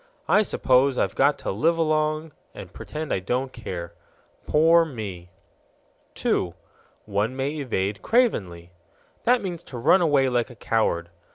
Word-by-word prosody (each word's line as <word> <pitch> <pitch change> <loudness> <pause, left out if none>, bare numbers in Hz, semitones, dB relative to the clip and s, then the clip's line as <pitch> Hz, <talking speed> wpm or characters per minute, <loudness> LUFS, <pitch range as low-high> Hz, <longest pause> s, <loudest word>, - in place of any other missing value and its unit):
I 210 - +5
suppose 130 -8 +2
I've - - 0
got 140 +2 +3
to - - -4
live 160 - +1
along 155 0 0 0.2
and - - -10
pretend 155 0 -5
I - - 0
don't 125 +7 -2
care. 85 -7 -6 0.5
Poor 165 +2 +5
me!" 100 - -7 0.9
2. 85 -2 0 0.5
One 105 +4 -1
may 135 +2 -1
evade 100 -7 -2
cravenly. 95 - 0 0.5
That 245 -1 +3
means 175 -3 -4
to 125 - -8
run 155 +10 +4
away 145 -5 +3
like 120 -1 0
a 120 - -12
coward. 90 -7 -1
130 Hz, 145 wpm, -24 LUFS, 100-155 Hz, 0.9 s, I